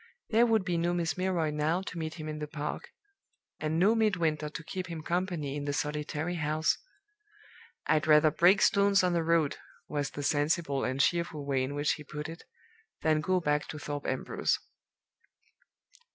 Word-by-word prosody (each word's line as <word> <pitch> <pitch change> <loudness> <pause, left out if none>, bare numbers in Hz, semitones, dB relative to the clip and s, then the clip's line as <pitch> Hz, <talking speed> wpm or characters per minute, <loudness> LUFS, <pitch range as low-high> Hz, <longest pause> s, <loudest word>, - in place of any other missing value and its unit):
There 230 +2 +5
would 220 -4 +2
be 175 -2 0
no 175 +1 +1
Miss 170 -1 -1
Milroy 180 -4 0
now 155 +4 0
to 180 - -7
meet 160 0 -4
him 155 -2 -7
in 155 0 -4
the 150 - -4
park, 150 0 -5 0.7
and 155 +1 -1
no 195 +6 +5
Midwinter 170 -9 +1
to 160 +2 -7
keep 185 +2 -5
him 165 -3 -6
company 170 -5 -2
in 145 -1 -4
the 145 - -1
solitary 150 +3 -2
house. 155 0 +1 1.1
'I'd 155 -1 +2
rather 155 0 +6
break 180 +6 +5
stones 200 -1 +4
on 180 -1 +2
the 170 - +2
road,' 165 -3 +2 0.3
was 145 -2 -2
the 145 - -6
sensible 145 -1 +1
and 130 +1 -1
cheerful 160 -1 +1
way 135 -2 +1
in 135 +2 -3
which 145 +1 +1
he 150 - -8
put 150 +1 -6
it, 165 +1 -10 0.6
'than 155 -1 +3
go 185 +3 +1
back 150 -3 0
to 150 - -6
Thorpe 145 -1 -5
Ambrose. 130 - 0
155 Hz, 180 wpm, -30 LUFS, 150-175 Hz, 1.1 s, rather